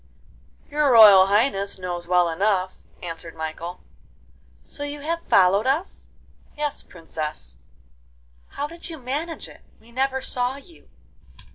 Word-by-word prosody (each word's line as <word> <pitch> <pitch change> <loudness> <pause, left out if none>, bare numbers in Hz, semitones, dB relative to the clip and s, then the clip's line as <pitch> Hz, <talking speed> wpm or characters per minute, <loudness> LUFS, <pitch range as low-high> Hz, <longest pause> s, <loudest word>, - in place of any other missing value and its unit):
'Your 295 -1 +1
Royal 205 -5 +9
Highness 200 -1 +2
knows 175 -2 -5
well 180 -1 +3
enough,' 185 +2 0 0.2
answered 165 -1 -7
Michael. 165 +2 -6 0.8
'So 290 - -7
you 290 0 -5
have 335 +3 -2
followed 195 +5 +4
us?' 305 +8 -2 0.5
'Yes, 295 -1 -2
Princess.' 150 - -7 0.9
'How 285 - -5
did 335 +3 -9
you 325 - -7
manage 295 +6 -4
it? - - -15 0.2
we 230 +2 -20
never 265 +2 0
saw 250 0 -1
you. 300 +4 -16
215 Hz, 125 wpm, -23 LUFS, 180-285 Hz, 0.9 s, Royal